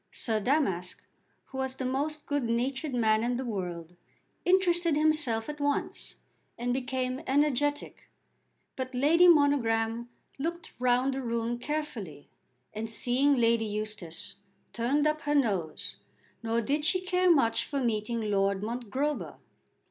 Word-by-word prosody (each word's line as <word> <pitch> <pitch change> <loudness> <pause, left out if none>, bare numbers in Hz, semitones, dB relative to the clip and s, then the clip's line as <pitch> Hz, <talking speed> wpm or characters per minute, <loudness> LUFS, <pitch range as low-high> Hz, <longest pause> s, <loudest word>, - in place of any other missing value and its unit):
Sir 220 -3 -1
Damask, 200 - -1 0.4
who 265 - -6
was 265 0 -2
the 260 - -4
most 290 +4 -2
good 290 0 0
natured 260 +4 -1
man 220 -2 +3
in 245 +1 0
the 260 +2 -3
world, 175 -6 -5 0.5
interested 350 -3 +3
himself 300 -8 +2
at 300 0 -6
once 285 0 -2 0.4
and 245 +1 -1
became 255 0 -2
energetic; 290 +1 0 0.7
but 260 -1 -5
Lady 320 +7 +5
Monogram 235 -7 +3 0.3
looked 335 +3 -4
round 250 +2 +2
the 270 - -3
room 235 0 -2
carefully, 245 - -4 0.5
and 220 +1 -4
seeing 255 +6 +2
Lady 230 -2 +3
Eustace, 210 -5 -5 0.4
turned 270 +6 +1
up 305 0 +1
her 290 0 0
nose, 200 - -1 0.4
nor 230 0 0
did 290 +6 -1
she 345 +4 +3
care 365 0 +1
much 250 -9 +4
for 280 - -3
meeting 230 -1 -1
Lord 195 0 +1
Mongrober. 245 +6 -2
255 Hz, 135 wpm, -29 LUFS, 225-290 Hz, 0.7 s, Lady